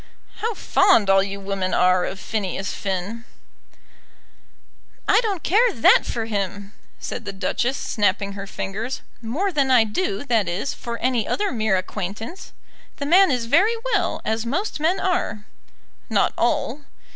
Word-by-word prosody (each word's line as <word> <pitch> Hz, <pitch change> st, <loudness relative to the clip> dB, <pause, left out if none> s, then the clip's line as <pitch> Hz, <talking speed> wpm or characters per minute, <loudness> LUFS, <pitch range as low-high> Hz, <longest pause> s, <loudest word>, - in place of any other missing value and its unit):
"How 450 Hz, +1 st, -2 dB
fond 365 Hz, -, +4 dB
all 195 Hz, 0 st, +6 dB
you 200 Hz, 0 st, -4 dB
women 195 Hz, -1 st, -2 dB
are 180 Hz, 0 st, +3 dB
of 190 Hz, -, -5 dB
Phineas 195 Hz, -2 st, -3 dB
Finn." 195 Hz, +4 st, -4 dB, 1.8 s
"I -, -, +5 dB
don't 405 Hz, -7 st, -2 dB
care 455 Hz, +7 st, +4 dB
that 230 Hz, -, +5 dB
for 230 Hz, -2 st, -2 dB
him," 200 Hz, -1 st, -4 dB, 0.3 s
said 240 Hz, -, -5 dB
the 200 Hz, -, -5 dB
Duchess, 240 Hz, +7 st, -1 dB
snapping 205 Hz, -1 st, 0 dB
her 200 Hz, 0 st, -7 dB
fingers 215 Hz, +7 st, -4 dB, 0.2 s
"more 295 Hz, -, -1 dB
than 280 Hz, -5 st, +1 dB
I 250 Hz, -3 st, +6 dB
do, 370 Hz, -, -2 dB
that 225 Hz, -7 st, +1 dB
is, 185 Hz, +10 st, -2 dB
for 235 Hz, -1 st, -6 dB
any 245 Hz, -2 st, 0 dB
other 410 Hz, 0 st, 0 dB
mere 220 Hz, -5 st, +1 dB
acquaintance. 205 Hz, -, -6 dB, 0.4 s
The 285 Hz, -, -4 dB
man 365 Hz, +5 st, +6 dB
is 250 Hz, -4 st, 0 dB
very 375 Hz, -, +3 dB, 0.2 s
well, 365 Hz, -4 st, 0 dB
as 220 Hz, 0 st, 0 dB
most 315 Hz, -, -2 dB
men 340 Hz, +5 st, +1 dB
are." 345 Hz, -, -1 dB, 0.6 s
"Not -, -, +2 dB
all." 295 Hz, -, 0 dB
230 Hz, 150 wpm, -22 LUFS, 200-315 Hz, 1.8 s, all